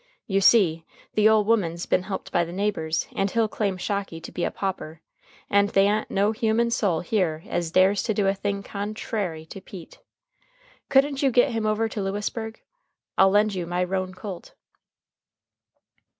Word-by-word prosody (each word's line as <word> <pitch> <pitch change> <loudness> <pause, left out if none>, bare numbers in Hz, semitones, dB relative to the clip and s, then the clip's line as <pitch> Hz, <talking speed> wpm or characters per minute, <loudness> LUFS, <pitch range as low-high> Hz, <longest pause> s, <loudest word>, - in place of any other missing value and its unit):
You 195 -1 +1
see, 185 -6 +4 0.3
the 215 0 +5
ole 220 -1 +4
woman's 175 -7 0
been - - +2
helped 190 +1 -6
by 175 - +2
the 170 - -6
neighbors, 175 -5 -1
and 195 +1 +1
he'll 225 +3 +1
claim 200 -3 -2
Shocky 200 -3 -3
to - - -9
be 175 - -3
a - - +1
pauper, 180 -5 -5 0.5
and 200 0 +3
they 195 0 +4
a'n't 215 +1 0
no 200 +2 +2
human 225 +1 +1
soul 195 -8 +1
here 170 -5 -1
as 170 -2 -2
dares 190 +4 +4
to - - +3
do 205 - +1
a 195 - +3
thing 200 0 -3
con_tra_ry 200 -5 -4
to 195 - -9
Pete. 180 -4 -12 0.9
Couldn't 275 0 +3
you 275 - +4
git 250 +2 +3
him 225 -2 -1
over 215 +1 +1
to 220 -1 -5
Lewisburg? 210 +3 -4 0.6
I'll 195 - +6
lend 210 +1 +3
you 180 -3 -4
my 175 +1 0
roan 185 0 -3
colt." 185 -2 -8
200 Hz, 175 wpm, -25 LUFS, 180-215 Hz, 0.9 s, I'll